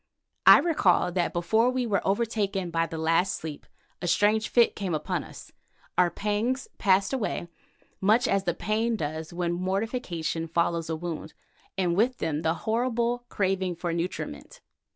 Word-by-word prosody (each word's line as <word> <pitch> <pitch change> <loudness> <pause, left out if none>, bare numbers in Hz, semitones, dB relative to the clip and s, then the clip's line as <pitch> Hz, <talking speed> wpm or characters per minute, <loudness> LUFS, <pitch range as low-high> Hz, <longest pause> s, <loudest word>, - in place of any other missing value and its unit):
I - - +11
recall 215 - +2
that 175 -1 0
before 220 +8 +2
we 255 -1 -1
were 205 -4 +1
overtaken 200 -3 -1
by 165 0 +1
the 165 - -6
last 165 +4 +2
sleep, 155 -2 -7 0.3
a 175 - -2
strange 215 +4 +2
fit 235 -1 +4
came 190 -5 -2
upon 155 - -2
us. - - -12 0.4
Our 180 -1 +4
pangs 215 +8 -1
passed 195 +2 +3
away, 215 -8 -2 0.5
much 215 +5 +4
as 195 0 +1
the 175 -2 0
pain 225 +4 0
does 155 -3 -4
when 175 0 -1
mortification 185 -3 -2
follows 170 0 0
a 160 - -1
wound, 160 -1 -6 0.4
and 175 -3 +1
with 240 +6 +2
them 155 -1 -2
that 160 - +1
horrible 240 +4 -1
craving 190 -3 0
for 170 0 -3
nutriment. 180 - -5
190 Hz, 155 wpm, -27 LUFS, 170-225 Hz, 0.5 s, I